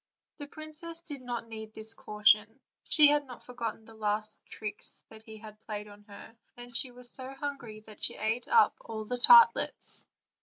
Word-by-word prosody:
The 290 -2 -8
princess 310 +2 -10
did 290 -5 -7
not 240 -2 -5
need 220 -1 -9
this 220 +1 -3
caution; 215 +3 +2 0.3
she 300 -2 +6
had 290 -1 +1
not 250 - -11
for 250 - -12
gotten 225 -2 -5
the 225 - -15
two 220 - -18
last 215 0 0
tricks 210 -1 -7 0.2
he 220 -1 -11
had 215 -1 -13
played 210 -2 -6
her, 205 +1 -14 0.2
and 240 0 -10
she 260 - +5
was 245 0 -3
so 265 +1 -3
hungry 270 -7 -6
that 215 -1 -15
she - - +1
ate 225 +3 -2
up 460 -2 +4
all 220 -1 -7
the 245 +3 -4
tartlets. 465 - +5
230 Hz, 185 wpm, -29 LUFS, 215-270 Hz, 0.3 s, she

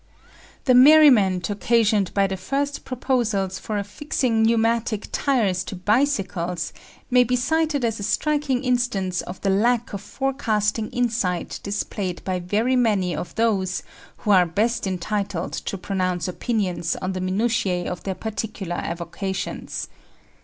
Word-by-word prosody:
The 255 - +5
merriment 250 - +6
occasioned 210 -1 +2
by 200 -1 +4
the 190 0 -2
first 275 +9 -3
proposals 225 -7 -1
for 215 - -3
affixing 225 +2 -1
pneumatic 225 -1 +1
tyres 210 -10 +1
to - - -6
bicycles 185 - 0 0.4
may 250 0 +6
be 250 +1 0
cited 305 +1 +1
as 225 -2 -1
a 200 +1 -2
striking 290 -1 0
instance 240 -8 0
of 180 - -8
the 195 - +1
lack 235 +4 +1
of 200 - -4
forecasting 220 -4 -1
insight 225 -8 -1
displayed 200 -2 -3
by 185 -1 -1
very 215 +8 +1
many 205 -8 +2
of - - -6
those 195 -5 0 0.3
who 210 - -1
are 180 -3 +6
best 210 +6 0
entitled 190 -1 -2
to 195 - -4
pronounce 185 -3 -1
opinions 180 -4 -1
on 185 - -3
the 185 -1 -4
minutiae 185 -2 0
of 180 - -5
their 190 -1 -3
particular 205 -4 -4
avocations. 180 +3 -4
210 Hz, 135 wpm, -23 LUFS, 185-240 Hz, 0.4 s, merriment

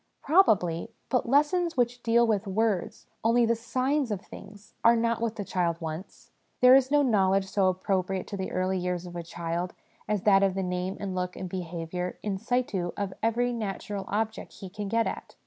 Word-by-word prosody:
Probably: 205 - +3 0.2
but' 250 -2 0
lessons 320 +4 +2
which 245 0 +1
deal 235 0 +4
with 215 -2 0
words, 205 -2 -1 0.2
only 235 +1 +4
the 230 - +3
signs 255 +4 0
of 205 -3 -2
things, 205 +1 -13
are 235 +1 +7
not 230 0 0
what 230 -1 -1
the 205 - -5
child 170 -3 0
wants. 160 +2 -7 0.3
There 250 0 +8
is 265 -1 +5
no 290 0 +4
knowledge 195 -5 +3
so 190 0 +1
appropriate 185 0 -1
to - - -4
the 190 - -4
early 185 +1 0
years 180 0 -2
of 175 -1 -9
a 170 - -3
child 170 +1 -4 0.3
as 210 -3 -1
that 195 -2 +5
of 195 -1 +2
the 195 - -1
name 180 +1 -2
and 195 -2 -4
look 180 0 -3
and 185 - -5
behaviour 180 0 -4
in 195 -2 -2
situ 220 -7 -1
of 200 -2 -2
every 240 +2 +1
natural 205 -2 -4
object 220 +2 -3
he 190 -3 -10
can 205 +1 -5
get 230 +2 +1
at. - - -5
200 Hz, 195 wpm, -28 LUFS, 185-230 Hz, 0.3 s, There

